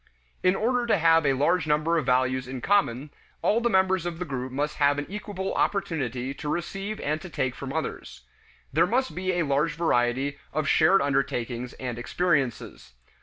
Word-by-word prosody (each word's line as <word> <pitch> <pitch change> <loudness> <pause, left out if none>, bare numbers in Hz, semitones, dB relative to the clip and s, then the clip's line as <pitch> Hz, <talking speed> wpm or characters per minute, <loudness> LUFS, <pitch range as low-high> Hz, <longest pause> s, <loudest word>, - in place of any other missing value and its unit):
In 185 +1 +3
order 240 +3 0
to 220 - +3
have 165 -2 +4
a 135 - +4
large 160 +6 +1
number 155 +3 +2
of 145 - -5
values 130 0 +1
in 130 0 -5
common, 145 -5 +1 0.3
all 225 +3 +3
the 235 - +2
members 190 -3 +2
of 170 -2 -4
the 180 - -4
group 130 -3 -4
must 145 +3 -2
have 145 -1 +3
an 145 - -2
equable 200 -2 -4
opportunity 135 - -1
to 145 +2 -6
receive 195 +6 -3
and 155 +2 -1
to 180 - -8
take 130 -5 -1
from 135 +1 -7
others. 160 - -5 0.5
There 165 +4 +4
must 260 +6 0
be 185 0 -1
a 175 -2 0
large 140 +3 +1
variety 135 -3 0
of 155 +1 -1
shared 185 +5 +4
undertakings 125 -3 -1
and 125 -2 -5
experiences. 140 - -1
150 Hz, 180 wpm, -26 LUFS, 130-185 Hz, 0.5 s, have